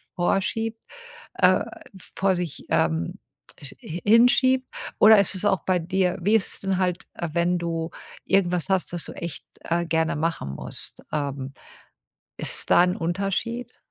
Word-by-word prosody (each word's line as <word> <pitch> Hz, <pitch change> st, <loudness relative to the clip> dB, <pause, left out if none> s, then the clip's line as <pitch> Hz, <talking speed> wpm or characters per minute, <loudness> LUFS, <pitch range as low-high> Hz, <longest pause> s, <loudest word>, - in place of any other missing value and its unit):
vorschiebt, 225 Hz, +5 st, 0 dB, 0.6 s
äh, -, -, +4 dB, 0.5 s
vor 190 Hz, -1 st, +2 dB
sich, 175 Hz, -4 st, -5 dB
ähm, 80 Hz, +1 st, 0 dB, 0.5 s
sch 140 Hz, -, -7 dB
hi 170 Hz, +2 st, -6 dB
hinschiebt? 255 Hz, +3 st, +5 dB, 0.3 s
Oder 215 Hz, 0 st, +8 dB
ist 200 Hz, -, +3 dB
es 185 Hz, -, -1 dB
auch 190 Hz, -4 st, +3 dB
bei 185 Hz, -1 st, +2 dB
dir 185 Hz, +2 st, 0 dB
wie 210 Hz, +5 st, +3 dB
ist 220 Hz, -, +1 dB
es -, -, -7 dB
denn 195 Hz, -1 st, 0 dB
halt, 180 Hz, -1 st, -1 dB, 0.3 s
wenn 175 Hz, +1 st, +1 dB
du 165 Hz, -1 st, -3 dB, 0.4 s
irgendwas 180 Hz, -2 st, +1 dB
hast, 190 Hz, -2 st, +1 dB
das 175 Hz, -, -3 dB
du -, -, -6 dB
echt, 170 Hz, -4 st, -7 dB, 0.2 s
äh, 170 Hz, +1 st, -1 dB
gerne 160 Hz, -1 st, +1 dB
machen 155 Hz, -, -2 dB
musst? -, -, -8 dB
Ähm, 140 Hz, -2 st, -3 dB, 0.8 s
ist -, -, 0 dB
es -, -, -1 dB
da 175 Hz, -, +6 dB
'n 180 Hz, 0 st, +1 dB
Unterschied? 200 Hz, +8 st, -2 dB
180 Hz, 155 wpm, -24 LUFS, 165-200 Hz, 0.8 s, Oder